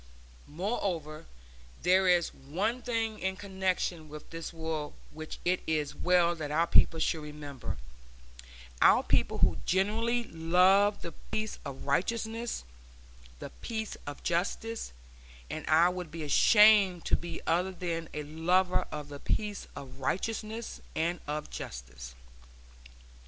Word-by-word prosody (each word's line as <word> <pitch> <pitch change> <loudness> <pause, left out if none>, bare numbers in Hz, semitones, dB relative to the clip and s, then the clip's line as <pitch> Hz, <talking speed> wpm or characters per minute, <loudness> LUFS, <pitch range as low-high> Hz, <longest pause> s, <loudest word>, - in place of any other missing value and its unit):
Moreover, 165 -3 -3 0.6
there 185 +1 +4
is 175 -2 +3
one 195 - -2
thing 225 -3 -1
in 190 +1 -1
connection 190 -4 -2
with 150 0 -10
this 165 0 -5
war 160 -2 -4 0.2
which 155 0 -7
it 180 +1 +2
is 150 -2 0
well 175 -1 +3
that 155 -3 -5
our 160 +3 +2
people 165 -1 +4
should 160 0 0
remember, 150 - -6 1.0
our - - +6
people - - +2
who - - +2
genuinely 225 +6 +1
love 185 +4 +3
the 170 - -5 0.2
peace 215 0 -2
of 140 -3 -7
righteousness, 225 +9 -1 0.7
the - - -8
peace 220 -2 -3
of 145 - -7
justice 200 +6 -1 0.6
and 155 0 -5
I 165 +3 +6
would 180 -2 -5
be 160 0 -6
ashamed 200 +3 +6
to - - +3
be 170 -1 -5
other 180 +3 +1
than 170 -3 -4
a 150 - -4
lover 180 +5 +1
of 150 -2 -6
the 145 -1 -8
peace 210 +5 -2
of 135 -1 -9
righteousness 220 - -3
and 170 +2 0
of 150 +1 -4
justice. - - -8
175 Hz, 130 wpm, -30 LUFS, 155-200 Hz, 1.0 s, our